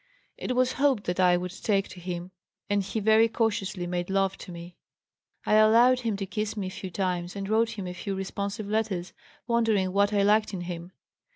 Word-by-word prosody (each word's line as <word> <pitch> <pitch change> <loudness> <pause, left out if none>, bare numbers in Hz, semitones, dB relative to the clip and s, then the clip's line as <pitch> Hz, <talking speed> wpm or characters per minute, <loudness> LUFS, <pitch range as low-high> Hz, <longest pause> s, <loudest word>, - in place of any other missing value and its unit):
It 250 - -3
was 255 0 +2
hoped 270 -7 +3
that 180 +1 -3
I 180 -1 +5
would 180 0 -4
take 195 +1 0
to 180 - -10
him 175 0 -5 0.4
and 205 0 +3
he 195 +3 -3
very 220 +2 +5
cautiously 210 -5 -1
made 175 0 -3
love 195 0 +1
to 185 - -9
me. 170 +1 -9 0.7
I - - +1
allowed 230 +4 +6
him 225 -5 -2
to 195 - -3
kiss 215 +2 -3
me 200 - -2
a - - -3
few 190 0 -6
times 180 -1 -2
and 195 -1 -4
wrote 225 +1 +1
him 195 - -4
a 180 - -5
few 195 +2 -4
responsive 200 +2 -4
letters, 205 -4 -2 0.3
wondering 225 -6 +1
what 200 +1 +3
I 200 -1 +2
liked 210 0 +3
in 180 - -4
him. 175 0 -6
200 Hz, 205 wpm, -27 LUFS, 180-220 Hz, 0.7 s, allowed